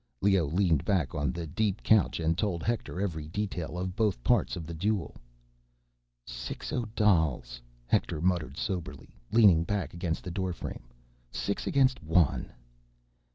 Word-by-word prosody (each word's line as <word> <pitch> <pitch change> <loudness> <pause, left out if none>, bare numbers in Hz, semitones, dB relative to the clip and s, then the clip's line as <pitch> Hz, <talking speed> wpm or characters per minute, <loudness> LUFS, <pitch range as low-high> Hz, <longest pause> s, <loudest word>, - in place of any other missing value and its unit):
Leoh 95 -5 +3
leaned 85 -2 +2
back 90 -10 0
on 75 -3 0
the 85 +4 -5
deep 100 +5 -1
couch 110 -6 +3
and 80 0 +1
told 90 -4 -1
Hector 115 -5 -2
every 80 -6 -2
detail 90 -2 -3
of 90 0 -3
both 105 - 0
parts - - +2
of 85 - -6
the 85 - -6
duel. 95 +2 -1 1.1
"Six - - -6
Odals," 80 - +1 0.2
Hector 65 - 0
muttered 85 -5 0
soberly, 90 -4 -4 0.2
leaning 100 -8 +6
back 100 +2 -2
against 85 -1 -3
the 90 - -5
doorframe. 90 -8 -4 0.4
"Six 100 +10 -3
against 130 -2 +3
one." 80 -1 +2
90 Hz, 140 wpm, -29 LUFS, 80-100 Hz, 1.1 s, leaning